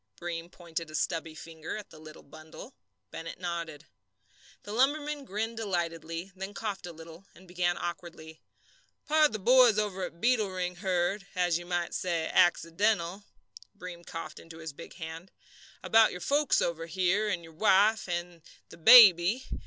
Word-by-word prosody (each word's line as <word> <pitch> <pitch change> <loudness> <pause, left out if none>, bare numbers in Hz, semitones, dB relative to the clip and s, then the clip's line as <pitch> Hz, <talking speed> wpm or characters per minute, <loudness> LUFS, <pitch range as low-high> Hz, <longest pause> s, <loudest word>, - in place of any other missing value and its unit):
Breem 170 -1 -5
pointed 165 -2 -6
a 155 - -8
stubby 165 -1 -2
finger 160 +3 -7
at 210 - -10
the 155 - -14
little 155 0 -13
bundle. 155 +2 -12 0.4
Bennett 165 +1 -8
nodded. 170 -4 -5 0.8
The 205 - -7
lumberman 290 +3 0
grinned 220 +2 -4
delightedly, 170 -3 -3
then 190 +2 -7
coughed 200 -4 -5
a - - -7
little, 165 +3 -13
and 185 +2 -17
began 175 0 -1
awkwardly: 170 -2 -7 0.6
"Pard, 305 0 +4
th' 215 -3 -6
boys 245 -2 +6
over 200 -3 -1
at 170 -1 -11
Beetle 230 -3 +2
Ring 180 -1 -4
heard 185 +2 -1
as 175 -2 +1
you 175 - -11
might 175 -1 -2
say, 170 -3 -1
accidental" 175 +2 +1 0.5
Breem 175 -1 -9
coughed 165 -2 -8
into 165 -1 -13
his 160 -3 -8
big - - -12
hand 165 +1 -8 0.5
"about 225 0 +5
your 180 - -7
folks 290 - +2
over 165 -1 -3
here, 190 +4 +1
your 170 -4 -4
wife 205 +3 +3
and 175 -1 -4 0.3
the - - -13
baby. 205 +2 +7
175 Hz, 155 wpm, -29 LUFS, 165-205 Hz, 0.8 s, baby